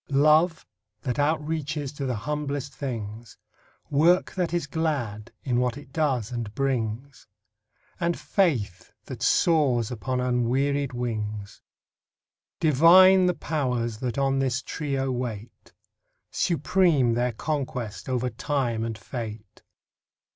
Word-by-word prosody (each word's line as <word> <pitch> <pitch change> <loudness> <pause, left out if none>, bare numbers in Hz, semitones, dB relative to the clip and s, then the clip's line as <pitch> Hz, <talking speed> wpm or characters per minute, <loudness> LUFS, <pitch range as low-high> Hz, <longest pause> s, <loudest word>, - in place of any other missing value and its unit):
Love, 155 +4 +3 0.4
that 130 -2 -2
outreaches 150 -1 -1
to 140 -2 -3
the 125 - -1
humblest 145 +3 -3
things; 115 -4 -6 0.5
Work 165 +6 +3
that 180 -3 -1
is 170 -3 -1
glad, 140 -9 -2
in 125 -3 0
what 125 0 0
it 145 -2 -13
does 135 -8 0
and 120 -4 -4
brings; 130 -1 -2 0.7
And 170 -1 0
faith 120 - -1
that - - -8
soars 135 -9 +3
upon 125 +2 -2
unwearied 125 +3 0
wings. 110 -4 -4 1.0
Divine 180 +5 +7
the 180 - +1
Powers 125 -7 -2
that 125 -1 -3
on 135 -1 +1
this 130 -1 0
trio 135 -3 -2
wait. 120 -3 -6 0.6
Supreme 165 -6 +2
their 120 +1 0
conquest, 125 -5 -4
over 125 -1 -1
Time 120 -2 -1
and 115 -1 -4
Fate. 110 -1 -7
135 Hz, 115 wpm, -26 LUFS, 120-150 Hz, 1.0 s, Divine